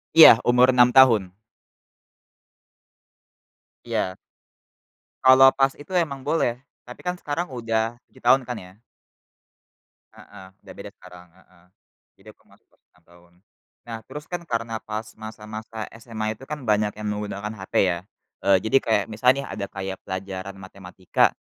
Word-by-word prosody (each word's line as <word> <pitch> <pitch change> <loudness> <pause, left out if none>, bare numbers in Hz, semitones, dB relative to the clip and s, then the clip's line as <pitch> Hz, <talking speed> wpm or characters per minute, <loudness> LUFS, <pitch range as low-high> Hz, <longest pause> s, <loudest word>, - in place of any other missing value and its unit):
Iya, 155 -8 +10
umur 125 +1 +5
6 125 0 +4
tahun. 110 -9 +5 2.5
Iya. 95 0 -2 1.1
Kalau 130 +1 +8
pas 135 0 +3
itu 145 +5 -13
emang 145 -6 -1
boleh, 125 -6 0 0.2
tapi 125 - -12
kan 180 0 -1
sekarang 175 0 -4
udah 115 -2 -2
7 - - -21
tahun 130 +2 +5
kan 125 -1 -6
ya. 90 0 -14 1.4
Heeh, 95 -2 -14
udah - - -13
beda - - -9
sekarang 90 -1 -15
heeh, 90 -1 -25 0.5
jadi - - -21
aku - - -32
masuk - - -26
umur - - -34
6 90 - -29
tahun. 85 0 -22 0.5
Nah 115 -1 -6
terus 150 0 -9
kan 175 -1 -4
karena 115 -5 -3
pas, 110 +1 -6
masa-masa 110 0 -8 0.2
SMA 110 -2 -4
itu 110 - -16
kan 150 -1 -4
banyak 105 -1 +1
yang 105 0 -5
menggunakan 105 0 -4
HP 95 0 -11
ya, 85 -2 0 0.5
eee, 100 -1 +5
jadi 110 +5 +3
kayak 110 -3 +2
misal 110 +4 +2
nih 140 +1 -5
ada 100 - -5
kayak 95 -1 -6
pelajaran 95 0 -6
matematika 95 -1 -1
110 Hz, 145 wpm, -23 LUFS, 95-125 Hz, 2.5 s, Iya